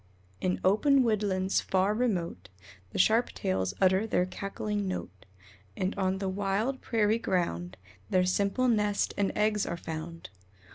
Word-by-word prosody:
In 180 Hz, 0 st, 0 dB
open 265 Hz, +8 st, +4 dB
woodlands 200 Hz, -4 st, +1 dB
far 190 Hz, +2 st, +1 dB
remote 180 Hz, -, -2 dB, 0.4 s
The -, -, -6 dB
Sharp 225 Hz, +5 st, +4 dB
tails 95 Hz, 0 st, -1 dB
utter 190 Hz, +3 st, +3 dB
their 180 Hz, -4 st, +2 dB
cackling 200 Hz, +2 st, -3 dB
note, 100 Hz, -, -6 dB, 0.5 s
And 185 Hz, +2 st, -1 dB
on 190 Hz, -1 st, 0 dB
the 195 Hz, 0 st, -3 dB
wild 205 Hz, +7 st, -1 dB
prairie 220 Hz, -1 st, +1 dB
ground 90 Hz, -, -2 dB, 0.3 s
Their 185 Hz, -1 st, +3 dB
simple 200 Hz, +7 st, +1 dB
nest 210 Hz, -3 st, +1 dB
and 200 Hz, -1 st, +1 dB
eggs 210 Hz, -1 st, +2 dB
are 170 Hz, -, -3 dB
found. 165 Hz, -, -7 dB
195 Hz, 140 wpm, -29 LUFS, 180-210 Hz, 0.5 s, open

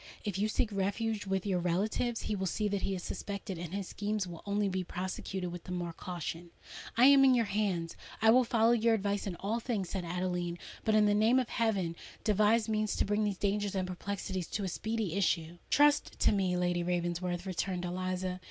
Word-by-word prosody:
If 195 Hz, -2 st, -3 dB
you 210 Hz, -, +2 dB
seek 220 Hz, +1 st, 0 dB
refuge 205 Hz, +2 st, -1 dB
with 190 Hz, 0 st, -1 dB
your 190 Hz, -3 st, +1 dB
relatives, 205 Hz, +7 st, 0 dB
he 210 Hz, -, -1 dB
will 190 Hz, -1 st, -1 dB
see 210 Hz, +4 st, 0 dB
that 200 Hz, -1 st, -1 dB
he 195 Hz, -, -1 dB
is 180 Hz, -, -6 dB
suspected; 200 Hz, -3 st, -5 dB
and 170 Hz, -2 st, -6 dB
his 195 Hz, -1 st, -3 dB
schemes 210 Hz, -1 st, -2 dB
will 170 Hz, -2 st, -8 dB
only 205 Hz, 0 st, +1 dB
be 185 Hz, -1 st, -1 dB
prosecuted 185 Hz, 0 st, -4 dB
with 175 Hz, -1 st, -8 dB
the -, -, -7 dB
more 175 Hz, -2 st, -3 dB
caution." 170 Hz, -1 st, -5 dB, 0.5 s
"I 245 Hz, -, +7 dB
am 275 Hz, 0 st, +8 dB
in 260 Hz, -1 st, +6 dB
your 235 Hz, -2 st, +3 dB
hands—I 200 Hz, +1 st, 0 dB
will 255 Hz, +2 st, +6 dB
follow 230 Hz, -1 st, +3 dB
your 230 Hz, -1 st, +4 dB
advice 200 Hz, -1 st, -1 dB
in 185 Hz, -, -3 dB
all 210 Hz, +6 st, -2 dB
things," 220 Hz, -7 st, -2 dB
said 190 Hz, -2 st, -2 dB
Adeline: 175 Hz, 0 st, -2 dB, 0.3 s
"but, 220 Hz, -, +2 dB
in 215 Hz, -1 st, +5 dB
the 205 Hz, -, +4 dB
name 220 Hz, +4 st, +4 dB
of 255 Hz, -2 st, +1 dB
heaven! 195 Hz, -7 st, 0 dB, 0.3 s
devise 215 Hz, +1 st, +3 dB
means 215 Hz, -1 st, 0 dB
to -, -, +1 dB
bring 210 Hz, +1 st, +1 dB
these 205 Hz, -2 st, -1 dB
dangers 205 Hz, 0 st, 0 dB
and 185 Hz, -1 st, 0 dB
perplexities 190 Hz, -1 st, -4 dB
to 210 Hz, -, -3 dB
a -, -, -1 dB
speedy 220 Hz, 0 st, -2 dB
issue." 175 Hz, -3 st, 0 dB
"Trust 295 Hz, 0 st, +4 dB
to -, -, +5 dB
me, 190 Hz, -3 st, +1 dB
Lady 175 Hz, -1 st, +1 dB
Ravensworth," 175 Hz, +1 st, -1 dB
returned 185 Hz, -1 st, -2 dB
Eliza. 185 Hz, +1 st, -2 dB
195 Hz, 205 wpm, -32 LUFS, 180-215 Hz, 0.5 s, am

